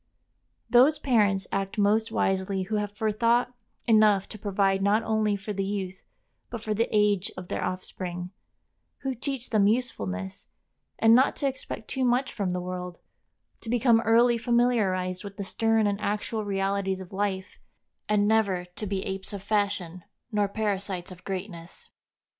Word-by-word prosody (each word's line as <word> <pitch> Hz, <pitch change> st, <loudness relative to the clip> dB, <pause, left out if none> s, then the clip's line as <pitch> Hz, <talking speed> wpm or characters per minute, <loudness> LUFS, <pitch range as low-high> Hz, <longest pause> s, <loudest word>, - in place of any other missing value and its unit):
Those 260 Hz, +6 st, +5 dB
parents 210 Hz, -9 st, +2 dB
act 195 Hz, +2 st, -2 dB
most 215 Hz, +2 st, +2 dB
wisely 190 Hz, 0 st, 0 dB
who 215 Hz, +3 st, -2 dB
have 205 Hz, 0 st, -3 dB
forethought 230 Hz, +3 st, +2 dB, 0.3 s
enough 215 Hz, -4 st, +4 dB
to 215 Hz, -, -9 dB
provide 195 Hz, -1 st, +1 dB
not 205 Hz, +3 st, +3 dB
only 215 Hz, -2 st, +1 dB
for 200 Hz, +1 st, -5 dB
the 195 Hz, 0 st, -1 dB
youth, 195 Hz, -2 st, -4 dB, 0.5 s
but 235 Hz, -2 st, -6 dB
for 215 Hz, -, -1 dB
the 225 Hz, +3 st, 0 dB
age 210 Hz, -2 st, +2 dB
of 180 Hz, -1 st, -8 dB
their -, -, -2 dB
offspring; 180 Hz, -1 st, -4 dB, 0.7 s
who 270 Hz, -1 st, -2 dB
teach 255 Hz, 0 st, -4 dB
them 210 Hz, -3 st, +4 dB
usefulness, 95 Hz, -, -2 dB, 0.5 s
and 225 Hz, 0 st, +5 dB
not 260 Hz, +3 st, +5 dB
to 280 Hz, -, -1 dB
expect 260 Hz, -4 st, -5 dB
too 265 Hz, -, -2 dB
much 250 Hz, +2 st, +1 dB
from 200 Hz, -5 st, -2 dB
the 180 Hz, -, -1 dB
world; 180 Hz, -1 st, -5 dB, 0.6 s
to 225 Hz, -, -8 dB
become 235 Hz, -1 st, +4 dB
early 235 Hz, +1 st, +4 dB
familiarized 220 Hz, -7 st, +1 dB
with 200 Hz, 0 st, -9 dB
the 200 Hz, -, -3 dB
stern 225 Hz, +2 st, +1 dB
and 205 Hz, 0 st, 0 dB
actual 210 Hz, +1 st, -2 dB
realities 195 Hz, -1 st, -1 dB
of 190 Hz, +1 st, -10 dB
life, 190 Hz, -1 st, -3 dB, 0.5 s
and 205 Hz, -1 st, +3 dB
never 200 Hz, -5 st, +2 dB
to 215 Hz, -, -4 dB
be 190 Hz, -1 st, -2 dB
apes 195 Hz, +1 st, -5 dB
of 200 Hz, -1 st, -6 dB
fashion 200 Hz, -4 st, -1 dB, 0.3 s
nor 205 Hz, -1 st, +2 dB
parasites 200 Hz, -3 st, -3 dB
of 185 Hz, 0 st, -12 dB
greatness. 185 Hz, -3 st, -7 dB
205 Hz, 160 wpm, -27 LUFS, 190-225 Hz, 0.7 s, Those